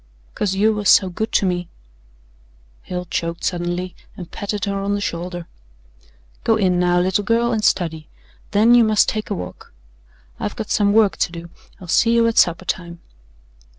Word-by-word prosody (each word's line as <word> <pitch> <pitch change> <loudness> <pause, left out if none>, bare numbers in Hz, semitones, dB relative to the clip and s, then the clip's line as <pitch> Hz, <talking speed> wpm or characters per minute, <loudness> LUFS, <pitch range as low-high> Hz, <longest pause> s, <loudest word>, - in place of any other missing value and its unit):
"Cause 195 -2 -1
you 215 +3 +3
was 210 -2 0
so 190 - +6
good 220 +5 -3
to - - +3
me." 180 -2 -2 1.1
Hale 180 0 -5
choked 170 -1 -4
suddenly 175 +1 -2 0.2
and 180 -3 -9
patted 205 0 -3
her 200 -1 -2
on 200 +1 -1
the - - -2
shoulder. 175 -2 -4 1.0
"Go 225 - +3
in, 185 -4 +1
now, 175 0 +2
little 185 +3 +1
girl, 230 +3 +1
and 220 -2 -1
study. 160 -6 0 0.4
Then 215 +3 +4
you 240 -1 +7
must 215 -2 +3
take 215 -1 -3
a - - -1
walk. 90 0 -9 0.7
I've - - -4
got - - -6
some 205 -1 +3
work 215 -2 +3
to - - 0
do. 170 0 -9 0.3
I'll 180 - -11
see 230 +7 +3
you 230 0 +4
at 230 0 +2
supper 175 +1 +2
time." 170 -2 -4
190 Hz, 180 wpm, -20 LUFS, 175-215 Hz, 1.1 s, you